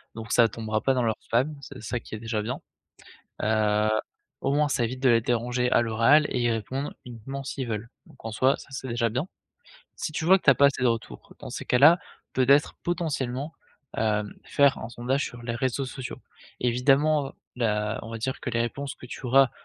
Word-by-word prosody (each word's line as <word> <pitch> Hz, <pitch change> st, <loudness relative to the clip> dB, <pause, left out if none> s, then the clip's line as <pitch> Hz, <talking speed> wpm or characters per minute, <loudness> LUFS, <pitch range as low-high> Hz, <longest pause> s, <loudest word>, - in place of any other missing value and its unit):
donc, 110 Hz, 0 st, -7 dB
ça 120 Hz, -1 st, +6 dB
tombera 110 Hz, 0 st, -3 dB
pas 135 Hz, -, +2 dB
dans 125 Hz, -, +1 dB
leurs 110 Hz, -2 st, -1 dB
spams, 130 Hz, +6 st, 0 dB
c'est -, -, -10 dB
ça 120 Hz, +1 st, -2 dB
qui 110 Hz, -, -9 dB
est -, -, -7 dB
déjà 110 Hz, -1 st, -2 dB
bien, 115 Hz, +4 st, -4 dB, 0.8 s
heu, 110 Hz, 0 st, +2 dB, 0.5 s
au 135 Hz, -, +1 dB
moins, 150 Hz, +1 st, +3 dB
ça 140 Hz, -4 st, 0 dB
évite 125 Hz, +3 st, -3 dB
de 135 Hz, -, +4 dB
les 115 Hz, -1 st, +5 dB
déranger 125 Hz, +2 st, 0 dB
à -, -, +5 dB
l'oral 115 Hz, +7 st, +4 dB
et 125 Hz, -, -1 dB
ils 120 Hz, 0 st, +2 dB
répondent 130 Hz, +6 st, -3 dB
uniquement 125 Hz, +3 st, -7 dB
s'ils 130 Hz, -1 st, -4 dB
veulent. 110 Hz, 0 st, -3 dB, 0.2 s
Donc, -, -, -17 dB
en 115 Hz, -, -3 dB
soi, 130 Hz, +5 st, +2 dB
ça, -, -, -13 dB
c'est 130 Hz, -1 st, -5 dB
déjà 115 Hz, 0 st, +1 dB
bien. 130 Hz, +7 st, -2 dB, 0.7 s
Si 155 Hz, -, -4 dB
tu 160 Hz, -, -3 dB
vois 190 Hz, +3 st, +6 dB
que -, -, -26 dB
tu -, -, +8 dB
as -, -, +6 dB
pas 140 Hz, -, +6 dB
assez 140 Hz, -2 st, 0 dB
de -, -, +4 dB
retours, 115 Hz, -1 st, -4 dB
dans -, -, -7 dB
ces -, -, -5 dB
cas-là, 145 Hz, +8 st, +6 dB, 0.4 s
peut-être, 140 Hz, +3 st, +4 dB
potentiellement, 145 Hz, -4 st, -2 dB, 0.4 s
hem, 105 Hz, -1 st, 0 dB
faire 140 Hz, -1 st, +3 dB
un 110 Hz, -, -6 dB
sondage 125 Hz, +4 st, -1 dB
sur 120 Hz, -1 st, -8 dB
les 115 Hz, 0 st, -3 dB
réseaux 130 Hz, +2 st, -1 dB
sociaux. 130 Hz, 0 st, -7 dB, 0.4 s
Évidemment, 135 Hz, +4 st, +2 dB, 0.2 s
la 105 Hz, -2 st, 0 dB
on 115 Hz, -, -8 dB
va 115 Hz, -, -4 dB
dire 130 Hz, +4 st, -3 dB
que -, -, -4 dB
les 115 Hz, 0 st, 0 dB
réponses 135 Hz, +4 st, -3 dB
que 125 Hz, -, -12 dB
tu 125 Hz, -, -7 dB
auras 135 Hz, +1 st, +5 dB
125 Hz, 215 wpm, -26 LUFS, 115-135 Hz, 0.8 s, tu